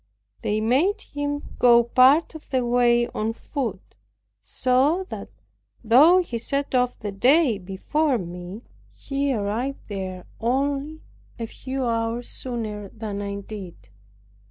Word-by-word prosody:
They 210 +1 0
made 310 - +2
him 290 -3 -4 0.2
go 235 -1 +6
part 260 +8 +4
of 315 - -12
the 255 -2 0
way 240 0 +3
on 220 +1 -2
foot, 230 - -5 0.5
so 275 +9 +1
that, - - -7 0.5
though 300 +11 +6
he 235 -8 -4
set 275 +4 -2
off 250 -1 +1
the 210 -2 -5
day 250 +2 +3
before 250 - 0
me, 180 +3 -7 0.3
he 280 0 -2
arrived 230 +4 -2
there 185 -2 -5
only 280 +5 -1 0.3
a 230 - -3
few 260 +3 -4
hours 230 +1 -1
sooner 215 -5 -5
than 210 -2 -5
I 200 0 -4
did. 185 - -10
240 Hz, 130 wpm, -24 LUFS, 210-275 Hz, 0.5 s, go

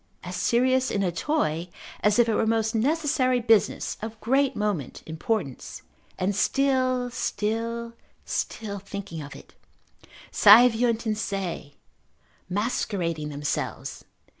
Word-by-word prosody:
As 180 0 -6
serious 255 +4 +2
in 200 - 0
a 180 - +1
toy, 170 - -1 0.3
as 210 +1 +2
if 240 -1 +5
it 225 - +1
were - - +2
a 220 - 0
most 225 0 +1
necessary 255 0 +1
business, 225 -3 +2
of 220 0 -6
great 270 +3 +1
moment, 205 - -3
importance, 160 - -4 0.3
and 190 +2 0
still, 255 0 +1
still, 230 +2 -2 0.3
still 205 -2 -3
thinking 200 -4 -7
of 145 - -9
it: - - -14 0.8
saeviunt 230 +2 +6
in 220 - +1
se, 190 -9 -4 0.7
macerating 180 -6 -2
themselves. 145 0 -4
220 Hz, 120 wpm, -26 LUFS, 190-245 Hz, 0.8 s, saeviunt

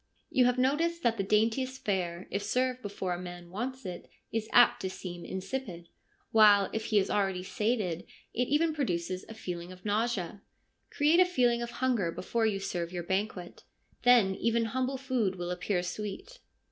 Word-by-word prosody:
You 255 - +4
have 250 0 +2
noticed 325 +6 +1
that 230 -1 +2
the 195 - 0
daintiest 225 +6 +1
fare, 180 -3 -1
if 200 - -1
served 255 +4 0
before 195 -4 -3
a 175 - -5
man 175 -1 -9
wants 255 +5 -4
it, 180 -1 -7 0.2
is 220 -1 -2
apt 245 0 +6
to 190 - -2
seem 175 -2 -7
insipid; 190 -4 -5 0.4
while, 205 -3 +6
if 220 0 -2
he 215 - +2
is 195 - +2
already 195 -3 0
sated, 205 -4 -1 0.3
it 245 +1 0
even 315 +2 +2
produces 185 - -2
a 225 - -8
feeling 180 -4 -6
of 185 +1 -13
nausea. 205 -3 -1 0.5
Create 305 +4 +3
a - - +9
feeling 245 -9 +2
of 235 - -3 0.2
hunger 220 -10 +1
before 225 +6 0
you 200 -2 -1
serve 175 -3 -3
your 175 -1 -4
banquet; 190 -1 -3 0.4
then 240 -6 +5
even 230 +3 +1
humble 260 +4 -1
food 255 -7 0
will 175 -1 -4
appear 180 0 -1
sweet.' 210 - -6
210 Hz, 175 wpm, -30 LUFS, 185-250 Hz, 0.5 s, a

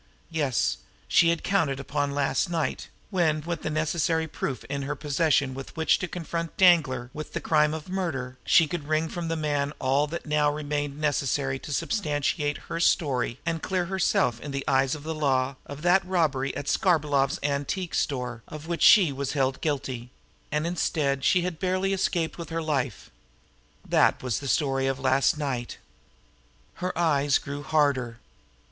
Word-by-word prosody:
Yes, 145 -6 0 0.3
she 165 - +5
had 170 -1 0
counted 160 -9 +1
upon 145 +1 -1
last 145 +5 +1
night, 165 -2 -2 0.2
when, 160 -5 +2
with 170 +2 -4
the - - -2
necessary 160 +1 0
proof 135 -3 -4
in 140 0 -4
her 140 +1 -3
possession 145 -2 +1
with 135 +3 -9
which 160 - +3
to 185 - -3
confront 170 -1 -5
Danglar 140 -10 +4
with 155 0 -7
the - - -1
crime 150 -1 +3
of 155 -1 -7
murder, 145 -9 -3
she 165 - +5
could 150 -1 -5
wring 155 +1 +1
from 175 -1 -4
the 165 - -1
man 145 -2 -1
all 135 +3 +1
that 170 +3 -6
now 150 -1 +2
remained 145 -1 -3
necessary 140 -2 0
to 150 - -8
substantiate 150 -4 -1
her - - -3
own - - -2
story 135 -7 +1
and 165 -1 -1
clear 185 -2 -1
herself 170 -10 +1
in 150 - -6
the 140 0 -3
eyes 135 +1 +2
of 145 - -10
the 160 +1 -3
law 135 -3 +1
of 145 +2 -8
that 180 +2 +4
robbery 155 -7 0
at 145 - -5
Skarbolov's 145 -8 +2
antique 145 +5 -2
store 125 -5 -2
of 155 0 -9
which 170 0 -3
she 190 -9 +7
was 140 0 -3
held 135 -2 0
guilty 135 -5 -3 0.4
and 150 +1 0
instead 150 -5 0
she 180 +3 +3
had 175 -3 -4
barely 185 +1 0
escaped 175 -3 -1
with 170 - -6
her 165 0 -2
life. 145 -5 -2 0.8
That - - +3
was 125 -4 -1
the 140 - -6
story 135 -1 +1
of 135 0 -1
last 130 +2 +2
night. 130 -5 -3 1.0
Her 185 +1 0
eyes 145 -5 +3
grew 140 +1 -6
harder. 140 -6 +1
150 Hz, 175 wpm, -26 LUFS, 135-165 Hz, 1.0 s, she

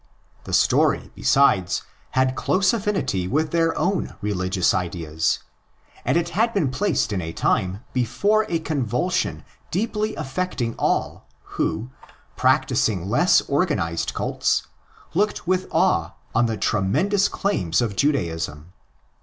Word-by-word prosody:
The - - -6
story, - - +3
besides, 100 -10 +3 0.3
had 130 0 +3
close 185 +6 +2
affinity 195 - -1
with 155 +9 0
their 165 -1 +1
own 190 +1 -1
religious 95 -3 0
ideas; 80 -3 -1 0.7
and - - +2
it 170 0 0
had 225 +5 +1
been 155 -10 +1
placed 130 - 0
in 95 - -1
the 80 -2 -4
time 95 +5 0
before 205 - +1
a 170 - +1
convulsion 155 +1 -1 0.2
deeply 215 +2 -1
affecting 140 -5 -2
all - - -1 0.2
who, 120 +4 -3 0.4
practising 95 -3 +1
less 175 +10 +4
organised 140 - 0
cults, - - 0 0.5
looked 205 +4 0
with 185 +1 0
awe - - +2 0.2
on 120 0 +3
the 110 -1 -2
tremendous 185 - +1
claims 90 - 0
of 115 -5 -1
Judaism. 85 - -1
130 Hz, 120 wpm, -23 LUFS, -, 0.7 s, less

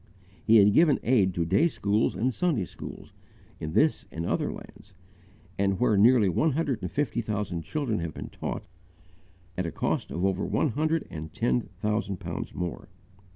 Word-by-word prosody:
He 115 - +5
had 105 -1 +7
given 155 0 +5
aid 105 -7 +3
to 85 - 0
day 155 - +3
schools 105 -6 0
and 125 +3 0
Sunday 155 - 0
schools, - - -10 0.5
in 80 0 -5
this 155 - +2
and 85 +1 -4
other - - 0
lands, - - -12 0.8
where 110 -2 +3
nearly 110 +1 +5
one 140 - +2
hundred 140 -6 -1
and - - -3
fifty 140 -4 -1
thousand 105 -6 -3
children 115 - -2
have 85 -2 -4
been - - -6
taught, - - -5 0.9
at 90 -2 -2
a - - -4
cost - - -1
of 90 +3 -2
over 95 -1 0
one 155 - +1
hundred 155 +5 0
and 80 -1 -7
ten 60 -1 0
thousand 105 -2 -1
pounds - - -5
more. 90 -2 -5
105 Hz, 170 wpm, -27 LUFS, 90-130 Hz, 0.9 s, had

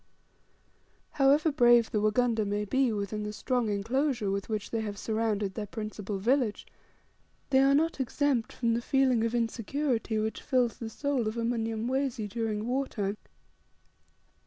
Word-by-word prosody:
However 290 +3 +3
brave 240 -4 +5
the 210 - 0
Wagunda 225 +1 +2
may 205 +1 -1
be 260 +4 +2
within 210 0 -3
the 210 0 -4
strong 245 +1 -1
enclosure 225 +2 0
with 200 +2 -3
which 215 -2 -3
they 225 - -1
have 205 -2 -5
surrounded 215 -2 -1
their 210 0 -5
principal 210 -1 -5
village, 235 +1 +1 0.9
they 265 - +5
are 275 +1 +5
not 320 +1 +1
exempt 265 -2 0
from 235 -2 0
the 235 - 0
feeling 260 -2 +2
of 230 +1 0
insecurity 235 0 -1
which 220 +1 -2
fills 250 -3 +1
the 230 - -5
soul 270 -1 -1
of 215 +2 -3
a 230 - -1
Mnyamwezi 230 +1 -1
during 215 0 -2
war 260 +3 0
time. 200 -2 -3
230 Hz, 155 wpm, -29 LUFS, 215-260 Hz, 0.9 s, brave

